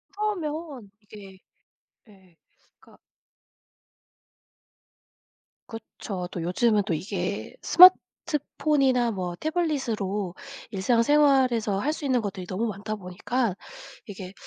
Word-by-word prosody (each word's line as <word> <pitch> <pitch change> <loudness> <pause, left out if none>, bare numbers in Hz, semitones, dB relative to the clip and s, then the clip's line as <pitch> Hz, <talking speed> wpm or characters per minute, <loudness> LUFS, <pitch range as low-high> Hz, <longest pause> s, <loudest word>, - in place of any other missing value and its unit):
그러면 315 - -4
이게 200 -2 -14 0.7
예. 190 -4 -22 0.4
그러니까 - - -21 2.7
그쵸. 200 -4 -7
또 175 - -5
요즘은 205 +4 +1
또 180 - -1
이게 190 - -4
스마트폰이나 295 -8 +4
뭐 180 -3 -4
태블릿으로 230 - -2 0.4
일상생활에서 240 0 +2
할 300 +7 -1
수 300 - -7
있는 255 -3 +1
것들이 195 -3 -5
너무 215 +5 -2
많다 210 +1 -5
보니까 205 +4 -2 0.5
이게 190 -1 -9
220 Hz, 220 characters per minute, -25 LUFS, 190-275 Hz, 2.7 s, 스마트폰이나